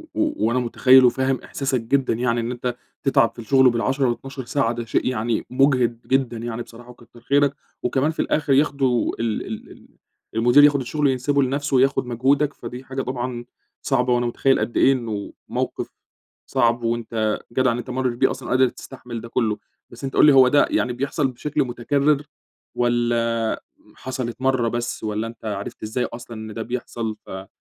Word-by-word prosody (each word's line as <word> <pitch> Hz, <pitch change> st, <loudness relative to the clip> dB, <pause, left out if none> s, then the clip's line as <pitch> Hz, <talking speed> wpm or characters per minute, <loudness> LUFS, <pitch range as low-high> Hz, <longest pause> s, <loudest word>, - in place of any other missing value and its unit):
وأنا 130 Hz, -, +1 dB
مُتخيّل 130 Hz, +2 st, +5 dB
وفاهم 130 Hz, +2 st, +1 dB
إحساسك 135 Hz, -3 st, -2 dB
جدًا 130 Hz, +3 st, +1 dB
يعني، 120 Hz, 0 st, 0 dB
إن 115 Hz, +1 st, -2 dB
أنت 125 Hz, 0 st, -3 dB, 0.3 s
تتعب 135 Hz, -4 st, +3 dB
في -, -, -13 dB
الشغل 130 Hz, +3 st, +4 dB
بال10 130 Hz, +2 st, +1 dB
و12 130 Hz, +1 st, -5 dB
ساعة 135 Hz, -4 st, 0 dB
ده 120 Hz, -1 st, -4 dB
شيء -, -, 0 dB
يعني 120 Hz, -2 st, -1 dB
مُجهِد 125 Hz, -3 st, +1 dB
جدًا 130 Hz, -3 st, +1 dB
يعني 120 Hz, 0 st, -4 dB
بصراحة 120 Hz, +1 st, -12 dB
وكتّر 120 Hz, -1 st, -16 dB
خيرك. 140 Hz, +2 st, +2 dB, 0.3 s
وكمان 135 Hz, +5 st, +1 dB
في 160 Hz, -, -2 dB
الآخر 145 Hz, -3 st, +1 dB
ياخدوا 135 Hz, -3 st, +2 dB
ال 115 Hz, -2 st, -1 dB
ال 110 Hz, -, -7 dB
ال -, -, -16 dB, 0.5 s
المدير 120 Hz, +5 st, +6 dB
ياخُد 145 Hz, -1 st, +5 dB
الشغل 145 Hz, +4 st, 0 dB
ينسبه 135 Hz, +2 st, +1 dB
لنفسه 140 Hz, +2 st, -1 dB
وياخُد 135 Hz, +1 st, +3 dB
مجهودك، 135 Hz, +4 st, +1 dB
فدي 125 Hz, +2 st, -8 dB
حاجة 135 Hz, 0 st, -4 dB
طبعًا 125 Hz, -1 st, -4 dB, 0.4 s
صعبة، 125 Hz, -2 st, +1 dB
وأنا 120 Hz, 0 st, +1 dB
مُتخيّل 135 Hz, +3 st, +2 dB
قد 120 Hz, -, -2 dB
إيه 135 Hz, -, +6 dB
إنه 110 Hz, -5 st, -4 dB, 0.2 s
موقف -, -, -2 dB, 0.6 s
صعب، 120 Hz, 0 st, +1 dB
وأنت 115 Hz, -2 st, -1 dB
جدع 130 Hz, 0 st, +3 dB
إن 120 Hz, -, -2 dB
أنت 120 Hz, -, -7 dB
مرّيت 125 Hz, -1 st, -1 dB
بيه -, -, +3 dB
أصلًا -, -, -7 dB
وقادر 130 Hz, 0 st, +3 dB
تستحمل 120 Hz, -3 st, -9 dB
ده 115 Hz, -, -8 dB
كُلّه. 110 Hz, -3 st, 0 dB, 0.3 s
بس -, -, -13 dB
أنت 135 Hz, -, -4 dB
قُل -, -, +6 dB
لي 150 Hz, -, +7 dB
هو 130 Hz, -1 st, +7 dB
ده 145 Hz, +3 st, +4 dB
يعني 125 Hz, -, +1 dB
بيحصل 140 Hz, +2 st, -1 dB
بشكل 145 Hz, +3 st, -2 dB
مُتكرّر 140 Hz, +4 st, +1 dB, 0.5 s
والّا 120 Hz, -1 st, 0 dB, 0.3 s
حصلت 130 Hz, -2 st, -5 dB
مرّة 130 Hz, -3 st, +2 dB
بس، 120 Hz, 0 st, -3 dB
والّا 110 Hz, +1 st, -2 dB
أنت 115 Hz, 0 st, -11 dB
عرفت 100 Hz, 0 st, -5 dB
إزاي 115 Hz, +3 st, -1 dB
أصلًا 120 Hz, -1 st, -8 dB
إن 110 Hz, 0 st, -7 dB
ده 115 Hz, -, -5 dB
بيحصل 115 Hz, -2 st, -4 dB
ف -, -, -16 dB
أ 95 Hz, 0 st, -7 dB
125 Hz, 180 wpm, -22 LUFS, 115-135 Hz, 0.6 s, لي